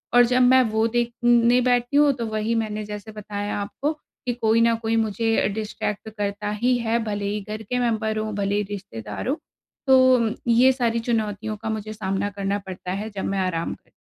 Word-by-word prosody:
और 245 - +8
जब 250 +1 +2
मैं 260 +1 +6
वो 220 +1 +2
देखने 240 +1 +3
बैठती 245 +2 +2
हूँ, 295 -1 +6
तो 240 -3 -4
वही 215 +1 -1
मैंने 215 -1 -2
जैसे 210 +1 -7
बताया 205 -1 -4
आपको 275 +8 -2
कि 255 -4 -7
कोई 225 -1 +2
न 230 0 +4
कोई 225 0 0
मुझे 225 0 +1
अ, - - +3
डिस्ट्रैक्ट 210 0 -4
करता 205 0 -2
ही 245 +4 +1
है, 235 0 0
भले 205 -1 -2
ही 205 +1 -2
घर 215 +1 -4
के 250 +4 -2
मेम्बर 220 -2 0
हों, 215 0 -2
भले 200 0 0
ही 210 - +1
रिश्तेदार 190 - -6
हों। 270 - +1 0.5
तो 255 -4 +5
ये 240 +3 +6
सारी 235 -3 0
चुनौतियों 215 -2 -1
का 220 - -3
मुझे 215 0 -4
सामना 195 -1 -2
करना 200 0 -2
पड़ता 185 -1 -6
है, 205 +3 -3
जब 200 -2 -5
मैं 195 0 -1
आराम 180 -3 -1
करती - - -15
हूँ। - - -30
220 Hz, 205 wpm, -23 LUFS, 205-240 Hz, 0.5 s, और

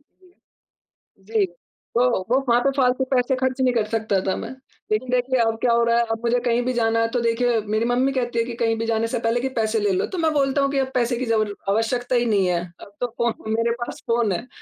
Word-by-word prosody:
जी। 360 +5 -27 1.1
जी, 200 - +4
तो 180 +6 -6 0.3
वो 255 +3 +4
वहाँ 235 - +5
पे 275 - +2
फालतू 255 0 +2
पैसे 255 +1 +2
ख़र्च 260 0 -1
नहीं 255 -1 +3
कर 225 -3 +1
सकता 220 -3 0
था 190 - +1
मैं। - - -6 0.4
लेकिन 220 +4 0
देखिए 250 0 +1
अब 225 -1 +1
क्या 240 - +3
हो 235 0 +3
रहा 235 0 +2
है, 235 - +3
अब 225 0 -2
मुझे 240 +1 +2
कहीं 235 0 +2
भी 255 - 0
जाना 230 -1 +1
है, 230 - +2
तो 245 - -1
देखिए 235 0 +1
मेरी 215 +2 0
मम्मी 250 +3 +2
कहती 240 -3 -1
है 230 - +1
कि 235 - -6
कहीं 230 -1 +1
भी 230 - -1
जाने 225 0 0
से 230 - -2
पहले 230 +1 0
कि, 265 - -1
"पैसे 225 -2 0
ले 205 -1 +1
लो।" 185 - +1
तो 370 - -6
मैं 315 - +3
बोलता 280 -1 +1
हूँ 275 0 +1
कि, 280 - -1
"अब 265 -1 -1
पैसे 240 -1 +1
की 255 - -2
जबल 215 -3 0 0.2
आवश्यकता 240 +4 0
ही 240 0 +2
नहीं 195 -2 +3
है, 175 -1 +1 0.2
अब - - -12
तो 245 - +1
फ़ोन 235 -1 +1 0.2
मेरे 230 0 +1
पास 240 - -5
फ़ोन 230 -3 +1
है।" 230 +8 -4
235 Hz, 260 wpm, -22 LUFS, 225-255 Hz, 1.1 s, वहाँ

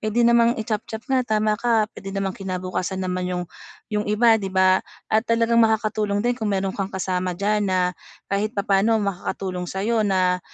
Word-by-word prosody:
puwede 215 +2 0
namang 235 0 +5
i 220 - -3
chop-chop 220 +1 -4
nga 265 -2 +1
tama 215 0 +2
ka 230 -3 +3
puwede 195 - -9
namang 195 -1 -1
kinabukasan 185 0 -3
naman 180 0 -2
yung 180 -1 -2 0.5
yung 210 0 -1
iba 225 +1 +4
di 195 - -3
ba 185 0 +4 0.3
at 220 - +5
talagang 230 0 +3
makakatulong 215 -1 +1
din 245 - +3
kung 220 -3 -3
meron 195 -1 0
kang 195 -1 -3
kasama 185 -2 -2
diyan 205 +1 0
na 180 -1 +1 0.4
kahit 210 +3 -1
papaano 200 +2 +2
makakatulong 185 -2 -3
sayo 215 +5 0
na 185 -3 +2
205 Hz, 175 wpm, -23 LUFS, 185-220 Hz, 0.5 s, namang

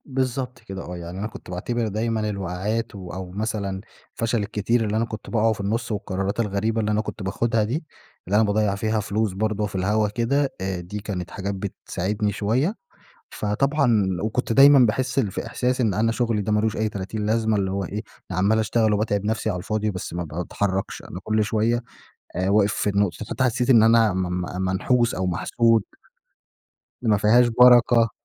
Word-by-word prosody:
بالضبط 130 -2 -2
كده، 95 -4 -8
آه. 90 +1 -6
يعني 85 +2 -7
أنا 105 - -2
كنت 110 - -12
باعتبِر 115 +6 -2
دايمًا 110 +1 -1
الوَقعَات، 100 +4 -3
و 90 -3 -8
أو 90 0 -6
مثلًا 100 -2 -3 0.3
الفَشَل 115 0 0
الكتير 105 +3 0
اللي 105 +1 -1
أنا 115 - +1
كنت 110 -1 -8
باقعَه 115 -1 +2
في 105 - -7
النص 115 +4 -2
والقرَارات 100 0 -2
الغريبة 110 +1 0
اللي 105 0 0
أنا 105 +1 +2
كنت 110 - -7
باخُدها 110 +3 0
دي، 125 +10 -2 0.4
اللي 100 - 0
أنا 110 - +5
باضيِّع 105 -1 +1
فيها 110 +2 0
فلوس 105 -1 -1
برضه 105 +1 -1
في 100 - -7
الهوا 105 +3 +1
كده، 135 +6 +1
آآ، 95 -1 -2
دي 90 +4 -6
كانت 100 -4 -5
حاجات 100 +1 -3
بتساعِدني 100 +1 -3
شوية. 120 - 0 0.6
فطبعًا 120 0 +1 0.2
وكنت 110 +2 -1
دايمًا 140 +3 +8
باحِس 130 +2 +2
في 100 -6 -3
إحساس 125 +1 -1
إن 110 -6 +2
أنا 115 +3 +2
شغلي 115 -3 0
ده 105 - -1
ما 105 - +3
لوش 110 0 0
أي 110 0 0
تلاتين 105 +1 -4
لازمة، 110 0 +1
اللي 95 -2 0
هو 100 0 -2
إيه؟ 105 +4 -4 0.3
أنا 95 - -3
عمَّال 100 +4 +3
أشتغَل 110 0 +2
وباتعَب 105 -1 0
نفسي 110 +1 -1
على 90 - -2
الفاضِي، 110 +3 -1
بس 90 -2 -6
ما 85 0 -2
بتحرَّكش. 95 +4 -3
أنا 90 - -8
كل 110 +1 +1
شوية 115 +3 +1 0.5
آآ، 90 +1 0
واقِف 100 0 +3
في 105 - 0
النُّقطة 100 -2 +1
فحتى 130 - -1
حسِّيت 125 +1 +1
إن 115 -4 +7
أنا 115 -1 +5
م 95 - 0 0.4
م - - -1
منحُوس 115 +6 +1
أو 95 0 -2
محسُود. 115 +5 +2 1.2
إن - - +2
ما 105 - +4
فيهاش 120 +5 +5
برَكة. 120 -1 +6
105 Hz, 190 wpm, -23 LUFS, 100-115 Hz, 1.2 s, دايمًا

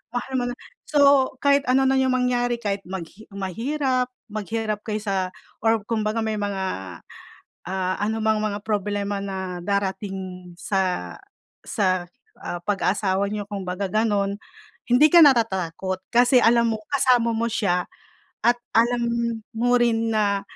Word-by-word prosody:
Mahal 245 +2 -3
mo 245 - -1
na 245 - -6 0.3
so 280 -3 +4
kahit 280 0 +4
ano 260 +1 +4
na 270 - +3
yung 260 -1 +2
mangyari 245 -1 +1
kahit 200 -3 -2 0.5
mahirap 250 - -1 0.2
maghirap 215 0 -3
kaysa 200 -4 -2 0.3
or 225 -1 +3
kumbaga 215 -1 -1
may 220 -1 -1
mga, 200 -2 -2 1.1
ah, 185 0 -1
anumang 220 0 +1
mga 205 -1 -1
problema 205 -1 -1
na 190 -2 -4
darating 190 -2 -3
sa 180 - -1 0.5
sa, 185 -4 0 0.3
ah, 175 - -4
pag-asawa 195 0 0
niyo 210 -1 -3
kumbaga 195 -1 -3
ganun. 205 -1 0 0.5
Hindi 250 +6 +6
ka 345 - +9
natatakot, 190 - +2
kasi 245 +2 +5
alam 235 0 +4
mo - - -4
kasama 250 -4 +3
mo 230 - 0
siya 180 -5 0 0.6
at 240 +1 +4 0.2
alam 240 +1 +3 0.5
mo 245 +2 +2
rin 230 -1 +1
na, 200 -2 +1
215 Hz, 130 wpm, -23 LUFS, 195-240 Hz, 1.1 s, ka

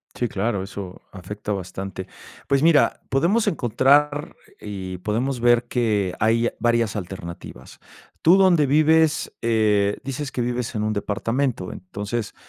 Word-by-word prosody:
Sí, 120 - -1
claro, 100 -1 -1
eso 95 -2 -8
afecta 105 +3 -6
bastante. 95 0 -5 0.4
Pues 140 +1 +2
mira, 160 -3 +4
podemos 175 - +2
encontrar 145 +4 +2 0.3
y 95 -3 -6
podemos 115 +7 -2
ver 120 0 +4
que 105 -7 0
hay 115 +2 +2
varias 115 -3 +1
alternativas. 85 -8 -8 0.4
Tú 170 +4 +6
donde 180 -6 +4
vives, 155 +2 +3
eh, 105 -3 +2
dices 135 +1 -5
que 125 - -2
vives 120 0 -3
en 105 - -1
un 110 0 0
departamento, 115 +1 -2
entonces, 100 +4 -5
115 Hz, 130 wpm, -23 LUFS, 100-135 Hz, 0.4 s, Tú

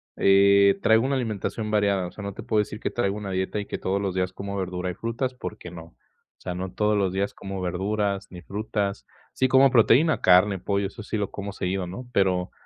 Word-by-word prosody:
Eh, 100 0 +5
traigo 110 +1 +4
una 135 0 0
alimentación 110 -2 -3
variada, 100 -3 +1
o - - -10
sea, 105 - -9
no 100 -1 -5
te - - -8
puedo 110 -2 +1
decir 105 +1 -2
que - - -3
traigo 100 -4 -1
una 100 -2 -5
dieta 95 +3 -2
y 100 - -4
que - - -5
todos 95 +1 -1
los 95 -2 -2
días 95 0 0
como 100 +1 -6
verdura 90 -1 -3
y 90 - -3
frutas, 120 +5 -3
porque 105 -7 -8
no, 85 -1 -9
o 85 - -24 0.4
sea, 90 -1 -6
no 90 0 -4
todos 105 0 +1
los 95 -2 +1
días 95 +2 -2
como 95 -1 -6
verduras 100 +2 -1
ni 90 -1 -10
frutas, 100 0 -3 0.3
sí 130 -1 +1
como 135 +1 +6
proteína, 130 +6 +4
carne, 95 +1 +5
pollo, 100 0 -1
eso 105 +2 -10
sí 110 - -3
lo 100 -2 -2
como 100 0 -6
seguido, 90 -1 -2
¿no?, 120 +8 -8
pero 90 -3 +1
100 Hz, 230 wpm, -25 LUFS, 95-105 Hz, 0.4 s, como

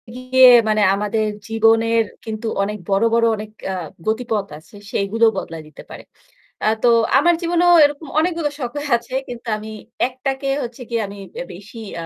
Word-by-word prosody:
গিয়ে 255 0 +5 0.2
মানে 215 0 +2
আমাদের 210 +2 -1 0.2
জীবনের 225 +1 +3 0.2
কিন্তু 220 0 -5 0.2
অনেক 210 +1 -3
বড়, 195 +3 +2
বড় 230 0 +3
অনেক 215 0 -8 0.2
অ্যা 190 - -2 0.3
গতিপথ 220 -2 -1
আছে, 155 +7 -18 0.2
সেইগুলো 215 +4 +1
বদলায় 165 -1 -6
দিতে 155 - -13
পারে। - - -10 0.6
অ্যা 215 - +2
তো 245 - +5 0.3
আমার 345 +4 +4
জীবনেও 350 +1 +3
এরকম 290 +2 -3
অনেকগুলো 330 -2 0
শখ 245 -2 -3 0.3
আছে 235 +2 -9
কিন্তু 240 0 -9
আমি 215 +1 -9 0.4
একটাকে 265 +2 -4 0.2
হচ্ছে 240 +1 -8
গিয়ে 230 -1 -1
আমি 200 +1 -10 0.3
বেশি 205 +5 -12
ইয়া 170 0 -6
230 Hz, 160 wpm, -20 LUFS, 215-260 Hz, 0.6 s, গিয়ে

